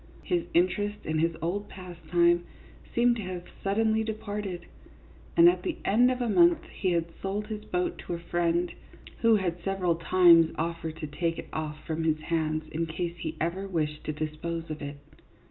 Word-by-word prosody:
His 175 Hz, -1 st, 0 dB
interest 205 Hz, +4 st, +2 dB
in 155 Hz, 0 st, 0 dB
his 165 Hz, 0 st, +1 dB
old 200 Hz, +5 st, -2 dB
pastime 175 Hz, -1 st, +1 dB, 0.5 s
seemed 240 Hz, 0 st, +4 dB
to -, -, -4 dB
have 185 Hz, -2 st, -5 dB, 0.2 s
suddenly 220 Hz, +2 st, +2 dB
departed; 210 Hz, -4 st, -4 dB, 0.7 s
and 340 Hz, 0 st, +9 dB
at 350 Hz, -, +4 dB
the 350 Hz, -4 st, -3 dB
end 240 Hz, +5 st, +5 dB
of 255 Hz, 0 st, -1 dB
a -, -, 0 dB
month 340 Hz, +6 st, +4 dB
he 185 Hz, -3 st, 0 dB
had 170 Hz, 0 st, -1 dB
sold 200 Hz, +2 st, -2 dB
his 210 Hz, -1 st, -6 dB
boat 180 Hz, 0 st, -1 dB
to 175 Hz, -, -2 dB
a -, -, -6 dB
friend, 170 Hz, 0 st, 0 dB, 0.5 s
who 230 Hz, -2 st, +5 dB
had 180 Hz, -4 st, -1 dB
several 185 Hz, -3 st, 0 dB
times 170 Hz, -1 st, +6 dB
offered 165 Hz, -1 st, -3 dB
to -, -, -2 dB
take 165 Hz, +3 st, -2 dB
it -, -, -7 dB
off 155 Hz, -1 st, -4 dB
from 160 Hz, 0 st, -2 dB
his 160 Hz, -1 st, +2 dB
hands 155 Hz, -1 st, -1 dB
in 165 Hz, +1 st, -1 dB
case 170 Hz, +1 st, -3 dB
he 160 Hz, -1 st, -4 dB
ever 180 Hz, +4 st, -2 dB
wished 155 Hz, -5 st, -2 dB
to -, -, -1 dB
dispose 155 Hz, +2 st, -4 dB
of 155 Hz, -, -5 dB
it. 145 Hz, 0 st, -6 dB
175 Hz, 180 wpm, -28 LUFS, 160-205 Hz, 0.7 s, and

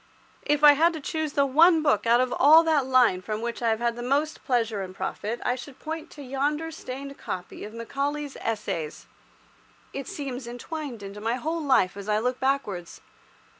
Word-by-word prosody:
If 295 Hz, 0 st, +1 dB
I 295 Hz, -1 st, +10 dB
had 330 Hz, +4 st, +3 dB
to 320 Hz, -, -5 dB
choose 310 Hz, 0 st, -3 dB
the 280 Hz, -, +3 dB
one 320 Hz, +4 st, +5 dB
book 230 Hz, -7 st, +2 dB
out 235 Hz, +1 st, +5 dB
of 255 Hz, 0 st, +1 dB
all 310 Hz, +4 st, +8 dB
that 305 Hz, -5 st, +2 dB
line 250 Hz, -8 st, +4 dB
from 215 Hz, +2 st, -4 dB
which 235 Hz, +1 st, -4 dB
I 230 Hz, -, +2 dB
have 220 Hz, -, +2 dB
had 235 Hz, 0 st, -1 dB
most 285 Hz, +5 st, 0 dB
pleasure 225 Hz, -5 st, 0 dB
and 185 Hz, -1 st, -6 dB
most -, -, -22 dB
profit, 225 Hz, +3 st, -3 dB
I 245 Hz, -, +2 dB
should 255 Hz, +2 st, -9 dB
point 320 Hz, 0 st, -6 dB
to 290 Hz, -, -11 dB
yonder 290 Hz, +5 st, -1 dB
stained 275 Hz, -2 st, -7 dB
copy 180 Hz, -1 st, -6 dB
of 210 Hz, -, -7 dB
Macaulay's 280 Hz, +4 st, -3 dB
"Essays." 205 Hz, -8 st, -3 dB, 0.9 s
It 275 Hz, -1 st, -5 dB
seems 265 Hz, -4 st, -5 dB
entwined 245 Hz, -1 st, -6 dB
into 200 Hz, +1 st, -8 dB
my 230 Hz, +2 st, 0 dB
whole 320 Hz, +6 st, -3 dB
life 260 Hz, -11 st, +3 dB
as 200 Hz, +1 st, -7 dB
I 210 Hz, -, +3 dB
look 250 Hz, +3 st, -1 dB
backwards. 215 Hz, -11 st, -2 dB
260 Hz, 195 wpm, -26 LUFS, 225-295 Hz, 0.9 s, I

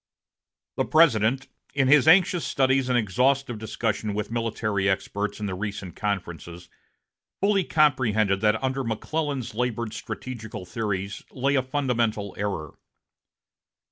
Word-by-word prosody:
The -, -, +1 dB
President, 135 Hz, -4 st, +3 dB, 0.3 s
in 135 Hz, -2 st, +3 dB
his 150 Hz, +1 st, +5 dB
anxious 180 Hz, 0 st, +5 dB
studies 130 Hz, -1 st, +1 dB
and 125 Hz, -, +3 dB
exhaustive 125 Hz, +3 st, +1 dB
discussion 110 Hz, -1 st, -2 dB
with 105 Hz, +1 st, -3 dB
military 110 Hz, -4 st, -1 dB
experts 100 Hz, +2 st, -2 dB
in 105 Hz, -, -3 dB
the 95 Hz, -, -2 dB
recent 100 Hz, -2 st, -5 dB
conferences, 90 Hz, -4 st, -4 dB, 0.7 s
fully 200 Hz, -1 st, +2 dB
comprehended 115 Hz, -, +2 dB
that 110 Hz, +3 st, +2 dB
under 130 Hz, 0 st, -1 dB
McClellan's 130 Hz, +2 st, -3 dB
labored 115 Hz, -1 st, -2 dB
strategical 110 Hz, -5 st, -7 dB
theories 100 Hz, -1 st, -3 dB
lay 135 Hz, +2 st, 0 dB
a 135 Hz, -, +3 dB
fundamental 120 Hz, -7 st, -1 dB
error. 95 Hz, -7 st, -4 dB
115 Hz, 120 wpm, -25 LUFS, 105-135 Hz, 0.7 s, his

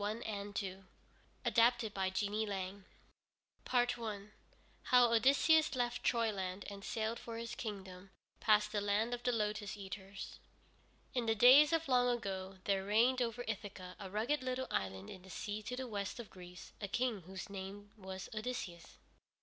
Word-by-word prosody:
ODYSSEUS 205 Hz, -3 st, -3 dB, 0.6 s
ADAPTED 235 Hz, -2 st, +4 dB
BY 190 Hz, -1 st, 0 dB
JEANIE 205 Hz, +3 st, 0 dB
LANG 195 Hz, 0 st, -4 dB, 0.9 s
I 230 Hz, -5 st, 0 dB, 0.6 s
HOW 245 Hz, -2 st, +6 dB
ODYSSEUS 280 Hz, +6 st, +5 dB
LEFT 245 Hz, -1 st, -1 dB
TROYLAND 200 Hz, -5 st, 0 dB
AND 200 Hz, 0 st, -8 dB
SAILED 225 Hz, +2 st, -2 dB
FOR 230 Hz, -1 st, -6 dB
HIS 230 Hz, 0 st, -5 dB
KINGDOM 195 Hz, -4 st, -6 dB, 0.3 s
PAST 210 Hz, -1 st, +4 dB
THE 205 Hz, -, 0 dB
LAND 205 Hz, +4 st, +1 dB
OF 240 Hz, -, -3 dB
THE 245 Hz, 0 st, +1 dB
LOTUS 210 Hz, -2 st, -1 dB
EATERS 195 Hz, 0 st, -7 dB, 0.7 s
In 245 Hz, -3 st, 0 dB
the 225 Hz, -, +3 dB
days 265 Hz, +7 st, +8 dB
of 330 Hz, -1 st, +1 dB
long 250 Hz, -2 st, +4 dB
ago 195 Hz, -5 st, -3 dB
there 195 Hz, -1 st, +1 dB
reigned 235 Hz, +6 st, +3 dB
over 240 Hz, 0 st, -1 dB
Ithaca, 195 Hz, -4 st, -5 dB
a 195 Hz, -2 st, -6 dB
rugged 225 Hz, +9 st, 0 dB
little 255 Hz, 0 st, -2 dB
island 95 Hz, 0 st, -2 dB
in 185 Hz, -, -9 dB
the 190 Hz, -, -14 dB
sea 210 Hz, +2 st, -4 dB
to 230 Hz, +4 st, -4 dB
the 260 Hz, 0 st, -4 dB
west 205 Hz, +1 st, -3 dB
of 235 Hz, -, -8 dB
Greece, 180 Hz, -1 st, -11 dB
a 200 Hz, -, -2 dB
King 235 Hz, 0 st, 0 dB
whose 190 Hz, 0 st, -6 dB
name 200 Hz, +1 st, -7 dB
was 190 Hz, -2 st, -7 dB
Odysseus. 215 Hz, -7 st, -5 dB
210 Hz, 155 wpm, -36 LUFS, 195-240 Hz, 0.9 s, days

